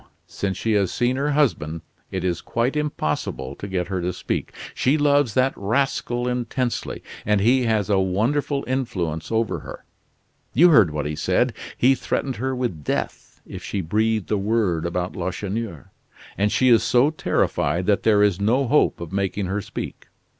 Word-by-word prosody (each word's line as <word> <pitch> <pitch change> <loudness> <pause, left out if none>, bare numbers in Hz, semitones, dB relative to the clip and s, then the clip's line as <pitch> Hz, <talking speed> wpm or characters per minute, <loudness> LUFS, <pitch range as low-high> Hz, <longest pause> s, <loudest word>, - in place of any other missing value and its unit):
Since 95 -1 -3
she 115 - -1
has 100 -4 +2
seen 125 +1 +1
her 140 +2 0
husband, 85 - +1 0.3
it 95 -1 -3
is 90 -2 -1
quite 120 +5 -1
impossible 75 - -2
to 100 - -7
get 95 -2 -2
her 95 -2 -2
to 90 +1 -1
speak. - - -3 0.2
She 135 +4 +2
loves 145 -6 +3
that 130 +1 +3
rascal 120 +2 -1
intensely, 125 0 -2 0.2
and 105 -1 +2
he 125 +5 +3
has 110 -4 +1
a 100 -2 +3
wonderful 125 +10 0
influence 90 - -2
over 115 -1 0
her. - - -10 0.7
You 175 +8 +7
heard 110 - +6
what 75 -1 -3
he 75 +1 -2
said. 75 - +1 0.2
He 130 +2 +5
threatened 130 -1 -2
her 130 +3 -2
with 120 -12 -3
death - - -4
if - - -9
she 100 - -2
breathed 110 +4 0
a 105 - +2
word 95 -6 0
about 90 +1 -3
Lacheneur, 95 - -4 0.4
and 100 +1 +1
she 130 - +3
is 115 -2 +6
so 125 +4 +3
terrified 90 - 0
that 100 0 +2
there 105 -2 +4
is 100 -3 +2
no 125 +7 +2
hope 145 -7 +2
of 85 - -6
making 100 0 -1
her 100 +3 -2
speak." - - -7
105 Hz, 175 wpm, -23 LUFS, 95-125 Hz, 0.7 s, You